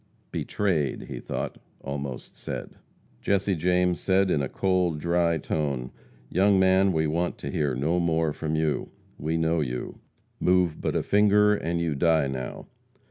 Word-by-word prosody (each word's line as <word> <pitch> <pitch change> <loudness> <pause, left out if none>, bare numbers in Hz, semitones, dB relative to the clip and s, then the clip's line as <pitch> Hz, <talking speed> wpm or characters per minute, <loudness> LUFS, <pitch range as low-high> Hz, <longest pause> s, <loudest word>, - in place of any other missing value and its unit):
"Betrayed," 85 -10 -1
he - - -7
thought, - - -4 0.2
almost 70 -2 -6
said. - - -6 0.5
Jesse 100 0 +1
James 90 +1 +1
said, 95 0 +2
in 75 - +2
a 70 - -2
cold, 90 -4 +1
dry 85 +1 +2
tone: 70 -4 -2 0.4
"Young 95 +6 +3
man, 95 +1 +4
we 80 -2 +1
want 85 +3 -1
to - - -5
hear 70 -4 0
no 80 +7 +1
more 80 -2 +1
from 80 0 -3
you. 80 -1 0 0.3
We 80 +3 -1
know 80 0 +1
you. 60 -3 -4 0.4
Move 90 -3 +2
but - - -1
a - - +1
finger 105 0 +4
and 85 -4 -1
you 85 -2 0
die 80 +1 +3
now. 65 -2 -5
85 Hz, 155 wpm, -26 LUFS, 75-95 Hz, 0.5 s, man